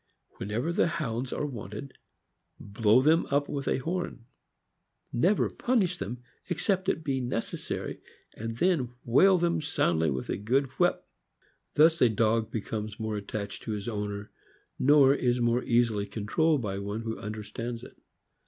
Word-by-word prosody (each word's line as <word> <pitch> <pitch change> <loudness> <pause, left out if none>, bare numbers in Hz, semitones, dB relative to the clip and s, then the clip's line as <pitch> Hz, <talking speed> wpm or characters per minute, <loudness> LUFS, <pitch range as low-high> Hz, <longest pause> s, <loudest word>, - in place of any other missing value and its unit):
Whenever 115 - -2
the 170 - +3
Hounds 130 -7 -3
are 150 - -2
wanted, 120 0 -7 0.6
blow 110 +4 +3
them 160 +3 +4
up 145 +1 +1
with 140 -1 -4
a - - +2
horn, 165 -4 -4 0.9
^fever 180 - +2
punish 200 -8 +1
them 120 +2 -5 0.3
except 190 +2 0
it 160 - -1
be 135 -3 -1
necessary, 120 -2 -3 0.3
and 115 +1 -5
then 165 -6 +2 0.2
whale 185 +11 +5
them 170 -1 +1
soundly 85 - +1
with 65 -2 -3
a - - -1
good 125 +7 +1
whip. - - +2 0.7
JSTo 155 -7 +5
dog 110 +1 +2
becomes 110 -1 -4
more 110 -1 -2
attached 100 0 -5
to 110 - -4
his 105 0 -5
owner, 105 -2 -4 0.5
nor 140 0 +6
is 125 -3 +1
more 120 +1 +2
easily 115 -4 +2
controlled 120 +8 +1
by 100 -2 -3
one 100 +2 -4
who 110 -1 -4
understands 110 +3 -5
it. - - -12
120 Hz, 145 wpm, -28 LUFS, 105-150 Hz, 0.9 s, nor